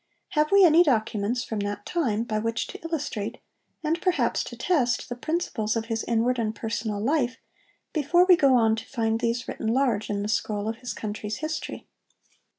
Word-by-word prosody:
Have 300 0 +1
we 395 -1 +7
any 330 0 +7
documents 235 -5 +1
from 220 - -4
that 205 0 -4
time 235 -11 0
by 215 -2 -2
which 230 +1 -1
to - - -10
illustrate, 295 -11 -3 0.5
and 325 +2 0
perhaps 365 -2 +1
to - - -8
test, 250 -10 +1
the 245 - -3
principles 245 -7 -2
of 225 -1 -1
his 225 -1 -2
inward 235 +2 +1
and 220 -1 -1
personal 220 -2 -3
life, 255 +1 0 0.6
before 345 +4 +4
we 370 -1 +7
go 275 -5 +4
on 225 -2 +4
to - - -6
find 225 -3 0
these 235 +1 -1
written 220 - -4
large 230 -3 +1
in 200 -1 -1
the - - -2
scroll 210 -1 -1
of 225 0 -2
his 250 0 -5
country's 210 0 -4
history? 310 +1 -4
235 Hz, 185 wpm, -26 LUFS, 220-300 Hz, 0.6 s, we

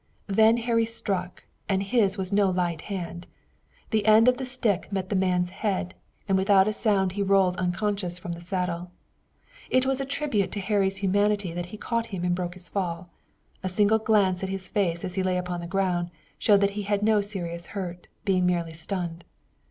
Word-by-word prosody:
Then 220 +3 +4
Harry 230 -1 +1
struck, 190 -5 -4 0.3
and 195 -1 +1
his 205 -2 +2
was 190 0 -1
no 200 -1 +4
light 175 -3 -1
hand. 175 -3 -5 0.6
The 220 -2 +1
end 220 +2 +7
of 250 0 +5
the 260 -1 -4
stick 230 -7 0
met 190 -2 -2
the 205 - 0
man's 180 -1 +1
head, 195 -2 -2 0.3
and 190 -1 +3
without 195 0 +5
a 215 - +1
sound 200 -4 +1
he 200 +2 -3
rolled 195 -2 +3
unconscious 185 0 -1
from 175 0 -6
the 170 0 -6
saddle. 180 -1 -3 0.8
It 255 0 +3
was 270 0 0
a - - -2
tribute 275 -8 -1
to 205 - -3
Harry's 195 -1 +1
humanity 205 -1 +1
that 175 0 -4
he 215 - -9
caught 230 +1 -2
him 190 -4 -5
and 175 - +2
broke 175 0 -3
his 180 -1 -5
fall. 175 -2 -3 0.5
A 185 - -2
single 210 +3 +3
glance 205 -5 +2
at 190 - -2
his 190 -1 -4
face 180 -5 0
as 180 - -4
he 190 - 0
lay 185 -1 +1
upon 180 -1 -3
the 170 - -6
ground 180 -2 0 0.3
showed 205 -2 +4
that 200 0 +3
he 205 +1 -4
had 205 0 -1
no 215 -1 +4
serious 170 -4 -5
hurt, 180 -3 -6 0.2
being 185 -2 +2
merely 170 -2 0
stunned. 170 0 -4
195 Hz, 200 wpm, -26 LUFS, 180-210 Hz, 0.8 s, end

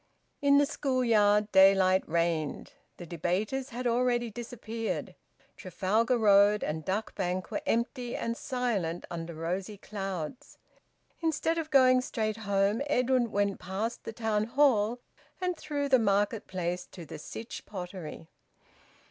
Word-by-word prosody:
In 280 0 +5
the 290 - +5
school 265 -4 -1
yard 210 -2 +3
daylight 190 -1 +6
reigned. 165 -2 -1 0.2
The 175 - -8
debaters 185 - -2
had 250 +1 -5
already 240 -1 +1
disappeared. 225 -1 -5 0.4
Trafalgar 215 +6 0
Road 205 -1 +5
and 155 +1 -3
Duck 205 +5 -2
Bank 185 -1 -3
were 305 - -2
empty 240 +1 -1
and 230 0 -2
silent 230 - -2
under 170 -1 -5
rosy 185 +6 -3
clouds. 195 - -6 0.6
Instead 325 0 0
of 315 -1 -4
going 255 -3 +5
straight 215 -3 -2
home 200 +1 +1
Edwin 250 -3 +2
went 200 -2 0
past 205 +6 -4
the - - -5
Town 220 -2 0
Hall 240 -3 +3 0.4
and 360 -1 -1
through 290 -3 -3
the 260 -2 +5
Market 205 0 +1
Place 180 -1 -3
to 175 -3 -10
the 150 - -9
Sytch 225 +9 -8
Pottery. 180 -5 -7
215 Hz, 135 wpm, -29 LUFS, 185-250 Hz, 0.6 s, daylight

